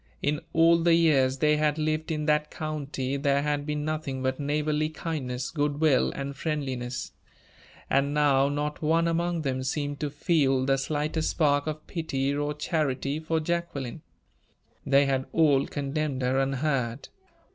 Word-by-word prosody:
In 150 0 +1
all 165 +1 +5
the 165 0 +4
years 135 -6 +3
they 150 +2 +3
had 150 0 +1
lived 155 0 -1
in 150 -1 -2
that 150 0 +2
county 140 -3 -3
there 140 0 +1
had 145 0 -1
been 150 0 -2
nothing 150 -4 -3
but 130 +1 -1
neighborly 150 +1 0
kindness, 135 -6 -4
good 145 -2 -1
will, 155 -4 +3
and 140 0 -5
friendliness; 130 -5 -3 0.8
and 140 +1 +2
now, 140 -2 +3
not 150 +1 -3
one 165 +2 +2
among 170 0 0
them, 130 -2 -1
seemed 145 +2 -2
to 150 - -2
feel 140 -3 +1
the 135 0 +2
slightest 155 +3 -1
spark 145 -2 +2
of 155 0 -4
pity 140 -5 -2
or 145 +1 -2
charity 150 -2 -1
for 160 0 -1
Jacqueline. 160 -5 -3 0.9
They 140 +1 +5
had 135 -1 0
all 145 -4 +4
condemned 140 -1 -2
her 130 +1 +2
unheard. 135 -2 -1
145 Hz, 155 wpm, -27 LUFS, 135-155 Hz, 0.9 s, all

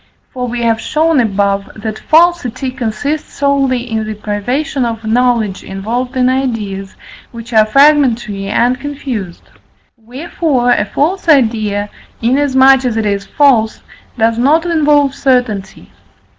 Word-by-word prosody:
For 250 -1 -4
we 240 0 -3
have 225 -1 +1
shown 315 -1 +1
above, 200 -3 0
that 215 0 -6
falsity 310 -6 +1
consists 265 +4 -4
solely 270 -3 0
in 220 -2 -2
the 215 0 -5
privation 245 +8 -2
of 225 -1 -4
knowledge 230 -3 0
involved 240 +7 -4
in 250 0 +3
ideas 225 -7 -3 0.4
which 235 0 -10
are 215 -1 +4
fragmentary 240 -7 +2
and 240 +4 +1
confused. 260 -10 -6 0.5
Wherefore, 250 +2 -2
a - - +2
false 345 +4 -1
idea, 220 -7 +2 0.3
inasmuch 265 +1 +3
as 240 -3 -1
it 220 - -1
is 200 -1 -2
false, 245 -7 +2 0.4
does 225 0 +1
not 305 +7 +2
involve 295 -4 +2
certainty. 245 -9 -1
245 Hz, 130 wpm, -14 LUFS, 220-275 Hz, 0.5 s, are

